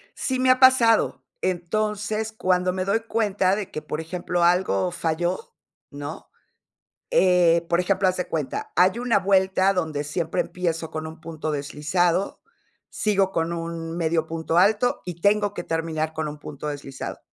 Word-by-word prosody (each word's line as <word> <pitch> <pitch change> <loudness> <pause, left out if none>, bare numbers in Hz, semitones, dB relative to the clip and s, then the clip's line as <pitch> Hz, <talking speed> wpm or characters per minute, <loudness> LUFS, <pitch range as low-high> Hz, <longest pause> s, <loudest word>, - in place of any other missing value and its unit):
Sí 260 -1 -2
me 255 0 +3
ha 255 0 +5
pasado. 255 -4 +5 0.2
Entonces, 215 +4 -1
cuando 185 -4 +1
me 185 0 -2
doy 200 +4 +1
cuenta 205 -4 +1
de 205 -2 -5
que, 155 - -5
por 155 +1 -4
ejemplo, 175 +1 -2
algo 180 +1 +2
falló, 175 +1 -2 0.4
¿no? 145 +2 -7 0.8
Eh, 175 - +4
por 170 - +2
ejemplo, 190 +1 +2
haz 185 - +1
de 180 - -2
cuenta, 155 -4 -3
hay 185 +6 +4
una 245 -3 +2
vuelta 190 0 +3
donde 160 -5 -2
siempre 160 +2 -1
empiezo 165 -3 -3
con 160 0 -4
un 160 +1 -11
punto 155 -1 -4
deslizado, 155 +6 0 0.5
sigo 195 -3 +1
con 165 -1 -1
un 165 -1 -5
medio 165 -1 0
punto 165 0 -2
alto 210 +6 +3
y 175 -2 -7
tengo 205 +1 +2
que 175 - -5
terminar 160 -1 -2
con 160 -1 -3
un 150 0 -7
punto 150 0 -7
deslizado. 140 -2 -6
175 Hz, 160 wpm, -24 LUFS, 160-195 Hz, 0.8 s, ha